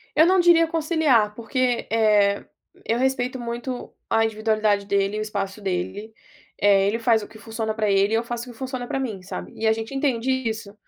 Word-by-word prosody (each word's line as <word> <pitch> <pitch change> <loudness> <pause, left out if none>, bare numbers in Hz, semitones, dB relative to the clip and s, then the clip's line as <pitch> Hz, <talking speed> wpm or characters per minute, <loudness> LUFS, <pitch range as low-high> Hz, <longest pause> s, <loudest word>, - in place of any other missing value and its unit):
Eu 315 - +6
não 370 +1 +4
diria 340 -1 +6
conciliar 305 -10 +2
porque, 245 +1 -1
eh, 210 -3 +3 0.4
eu 230 - 0
respeito 260 0 0
muito 240 +1 -5 0.2
a 225 0 +3
individualidade 215 -2 +1
dele, 200 +1 0
o - - -2
espaço 200 -1 -4
dele, 200 +3 -3 0.4
eh, 200 -1 +4
ele 225 +3 0
faz 225 -1 +3
o - - -8
que 220 - -15
funciona 220 -1 -4
pra 215 -2 0
ele 200 +2 +3
e - - +4
eu 230 - +1
faço 240 +1 -5
o - - -10
que - - -19
funciona 255 -2 -5
pra - - -2
mim, 220 -8 -4
sabe. 90 - -7
E 220 - -1
a 220 - +5
gente 225 +4 -6
entende 265 -2 0
isso, 225 -5 -3
225 Hz, 205 wpm, -23 LUFS, 210-255 Hz, 0.4 s, Eu